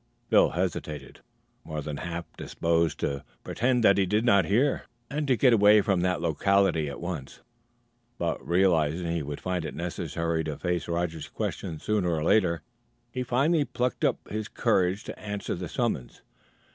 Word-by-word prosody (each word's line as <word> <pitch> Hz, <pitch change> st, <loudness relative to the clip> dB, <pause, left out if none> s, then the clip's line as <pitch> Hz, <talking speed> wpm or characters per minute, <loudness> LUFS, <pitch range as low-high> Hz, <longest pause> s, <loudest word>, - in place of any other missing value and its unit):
Phil -, -, +6 dB
hesitated, 80 Hz, -6 st, -4 dB, 0.4 s
more 80 Hz, -1 st, -5 dB
than 75 Hz, -1 st, -5 dB
half 85 Hz, 0 st, -4 dB
disposed 85 Hz, 0 st, 0 dB
to 70 Hz, 0 st, -2 dB, 0.2 s
pretend 125 Hz, 0 st, +1 dB
that 100 Hz, -2 st, +5 dB
he 95 Hz, -, +3 dB
did 105 Hz, +4 st, +1 dB
not 100 Hz, -7 st, +5 dB
hear 125 Hz, -, +1 dB, 0.2 s
and 150 Hz, +1 st, -2 dB
to 130 Hz, -3 st, +3 dB
get 125 Hz, -1 st, +5 dB
away 105 Hz, -1 st, +7 dB
from 95 Hz, -3 st, +1 dB
that 90 Hz, 0 st, +1 dB
locality 85 Hz, -1 st, +2 dB
at 70 Hz, -, -7 dB
once; 80 Hz, -6 st, -6 dB, 0.8 s
but, -, -, -2 dB
realizing 85 Hz, -2 st, +2 dB
he 85 Hz, -1 st, -1 dB
would 70 Hz, 0 st, -5 dB
find 90 Hz, -2 st, -2 dB
it -, -, -5 dB
necessary 85 Hz, -1 st, -2 dB
to 75 Hz, -2 st, -4 dB
face 90 Hz, -1 st, -2 dB
Roger's 85 Hz, -2 st, -2 dB
questions 80 Hz, -2 st, -4 dB
sooner 105 Hz, -4 st, +1 dB
or 80 Hz, -2 st, 0 dB
later, 85 Hz, -3 st, +2 dB, 0.5 s
he 125 Hz, -, -3 dB
finally 140 Hz, +6 st, +2 dB
plucked 125 Hz, -3 st, -2 dB
up -, -, +3 dB, 0.4 s
courage 95 Hz, -4 st, +2 dB
to -, -, -8 dB
answer 105 Hz, -1 st, -4 dB
the 90 Hz, 0 st, -5 dB
summons. 115 Hz, -, -2 dB
90 Hz, 160 wpm, -27 LUFS, 80-105 Hz, 0.8 s, away